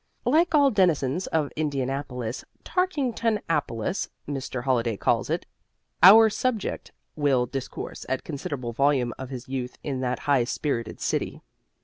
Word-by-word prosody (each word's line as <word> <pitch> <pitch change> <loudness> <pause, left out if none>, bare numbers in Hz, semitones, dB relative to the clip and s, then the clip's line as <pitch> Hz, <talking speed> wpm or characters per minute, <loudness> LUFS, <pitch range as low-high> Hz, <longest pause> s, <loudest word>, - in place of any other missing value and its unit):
Like 325 +6 +3
all 285 -2 +5
denizens 175 - +2
of 155 -3 0
Indianapolis 135 -4 -3 0.2
"Tarkingtonapolis," 225 - -1 0.2
Mr. 135 -3 -4
Holliday 120 -4 +1
calls - - +1
it - - -1 0.6
our 220 +5 +10
subject 225 0 -2 0.2
will 140 -5 +2
discourse 135 +1 -6
at 130 - -1
considerable 135 -5 -5
volume 130 -2 +2
of 130 -1 -6
his 130 -2 -7
youth 130 -1 -4
in 135 -3 -3
that 125 -1 -1
high 140 -4 +2
spirited 120 -3 -3
city. - - -2
140 Hz, 125 wpm, -26 LUFS, 125-190 Hz, 0.6 s, our